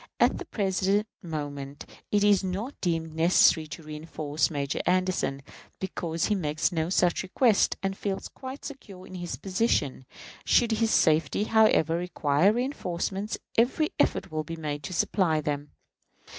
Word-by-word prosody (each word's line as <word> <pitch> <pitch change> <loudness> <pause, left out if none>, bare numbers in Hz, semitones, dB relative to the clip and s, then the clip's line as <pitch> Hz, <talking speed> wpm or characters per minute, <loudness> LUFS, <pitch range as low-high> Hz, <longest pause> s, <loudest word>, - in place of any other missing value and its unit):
At - - +3
the - - -6
present 195 0 0 0.2
moment 145 -5 -6 0.3
it 205 -1 +3
is 205 -2 +4
not 195 +9 -3
deemed 165 -3 -1
necessary 160 -1 +4
to 160 +2 -9
reënforce 155 0 -2
Major 140 -3 -2
Anderson, 180 -7 0 0.4
because 170 -3 -2
he 210 - +1
makes 155 -3 0
no 160 -1 -1
such 180 -2 +2
request, 210 +3 +2
and 195 0 -1
feels 195 -1 -3
quite 265 +1 -9
secure 200 -10 -9
in 185 - -12
his 175 -2 -4
position. 185 - -1 0.4
Should 235 -1 +3
his 225 0 +1
safety, 160 +2 +3
however, 215 -7 +4
require 175 0 +2
reënforcements, 210 -5 -2 0.2
every 270 +6 +2
effort 195 - +1
will 155 0 -2
be 165 +2 -6
made 150 -2 -4
to - - -5
supply 170 -2 +1
them. 145 -1 -3
180 Hz, 145 wpm, -27 LUFS, 155-205 Hz, 0.4 s, is